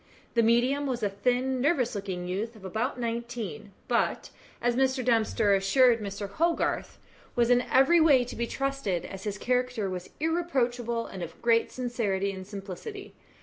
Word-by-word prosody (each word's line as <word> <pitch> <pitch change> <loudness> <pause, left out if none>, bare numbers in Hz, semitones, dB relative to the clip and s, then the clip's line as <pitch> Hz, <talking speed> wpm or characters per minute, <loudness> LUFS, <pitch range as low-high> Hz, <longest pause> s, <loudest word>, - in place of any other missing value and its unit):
The 235 - +4
medium 245 +5 +2
was 245 -4 -2
a 205 - +1
thin, 250 +5 0
nervous 275 -4 +2
looking 190 -4 -4
youth 210 +6 -3
of 200 -3 -13
about 230 +7 -2
nineteen; 235 -6 -4 0.2
but, - - 0 0.3
as 240 0 +1
Mr. 260 -1 +1
Dempster 220 -3 +3
assured 230 +5 +4
Mr. 200 0 -4
Hogarth, 330 +12 0 0.4
was 240 -1 +3
in 245 0 +5
every 270 +6 +6
way 285 -6 +6
to - - -8
be 235 0 -2
trusted, 275 -11 -2
as 195 0 -8
his 205 -1 -2
character 250 -4 0
was 180 -1 -6
irreproachable, 250 -8 0
and 190 - -8
of 170 -1 -7
great 230 -1 +3
sincerity 210 -6 -1
and 190 -1 -8
simplicity. 205 - -8
235 Hz, 160 wpm, -28 LUFS, 200-255 Hz, 0.4 s, every